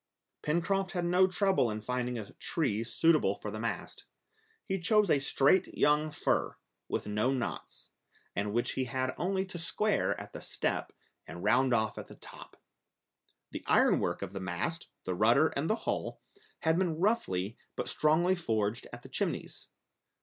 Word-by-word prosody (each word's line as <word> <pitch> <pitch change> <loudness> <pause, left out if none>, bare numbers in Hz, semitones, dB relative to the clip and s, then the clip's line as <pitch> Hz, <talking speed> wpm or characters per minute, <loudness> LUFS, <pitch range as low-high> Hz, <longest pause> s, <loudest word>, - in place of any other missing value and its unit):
Pencroft 185 +5 0
had 175 -2 -1
no 180 +2 +4
trouble 190 - +2
in 105 0 -3
finding 125 +2 -2
a 105 -3 -7
tree 115 -10 -1
suitable 155 -5 +3
for 105 - -6
the 110 - -5
mast. 115 +1 -4 0.6
He 195 -1 -1
chose 210 +2 +4
a 140 - +4
straight 140 +6 +2
young 150 +1 +3
fir, 150 - 0 0.3
with - - -2
no 105 +5 +1
knots, 125 -3 -5 0.4
and 100 +2 -1
which 120 +3 0
he 130 - -1
had 130 +1 -2
only 190 +3 -1
to 180 -2 -7
square 210 +5 0
at - - -10
the - - -7
step, - - -2 0.4
and 85 - -8
round 125 +5 +3
off 110 -3 +1
at - - -8
the - - -12
top. - - -13 0.9
The - - -6
ironwork - - +3
of 100 0 -6
the 95 - -4
mast, 95 - -3 0.2
the 90 - -2
rudder 115 - +4
and 145 +3 -2
the 220 - +3
hull, - - -2 0.4
had 160 +2 +2
been 175 -4 0
roughly 115 - 0 0.2
but - - -3
strongly 160 +4 +3
forged 110 - -1
at - - -10
the - - -11
Chimneys. - - -3
140 Hz, 165 wpm, -31 LUFS, 110-175 Hz, 0.9 s, no